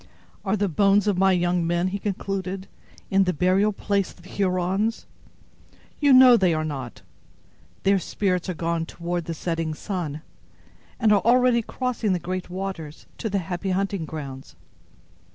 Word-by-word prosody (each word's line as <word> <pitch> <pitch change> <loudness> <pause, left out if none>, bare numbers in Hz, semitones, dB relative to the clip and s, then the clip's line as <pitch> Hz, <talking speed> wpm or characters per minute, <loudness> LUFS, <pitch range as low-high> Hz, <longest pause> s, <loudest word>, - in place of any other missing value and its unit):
"Are 200 +1 0
the 205 0 +1
bones 195 +3 +3
of 200 -3 +1
my 190 0 +5
young 175 -1 +1
men," 175 +2 +1
he 200 +2 -4
concluded, 195 -1 -3 0.4
"in 195 0 +4
the 180 - +1
burial 185 +5 +3
place 200 -1 -1
of 175 - -16
the 185 - -14
Hurons? 190 +3 0 0.9
You 285 -1 +4
know 255 -1 +9
they 185 -6 +3
are 155 0 -1
not. 135 -6 -6 0.8
Their 195 0 +4
spirits 185 -1 -1
are 180 - -2
gone 165 0 -2
toward 175 0 -4
the 165 - -4
setting 165 -1 -2
sun, 160 -5 -4 0.8
and 220 -3 +4
are 200 - +4
already 245 0 +4
crossing 235 -3 -2
the - - +1
great 185 +2 -4
waters, 180 -5 -6
to 220 - -2
the 200 - 0
happy 185 +2 -3
hunting 195 -2 -1
grounds. 140 -4 -8
185 Hz, 160 wpm, -24 LUFS, 170-200 Hz, 0.9 s, know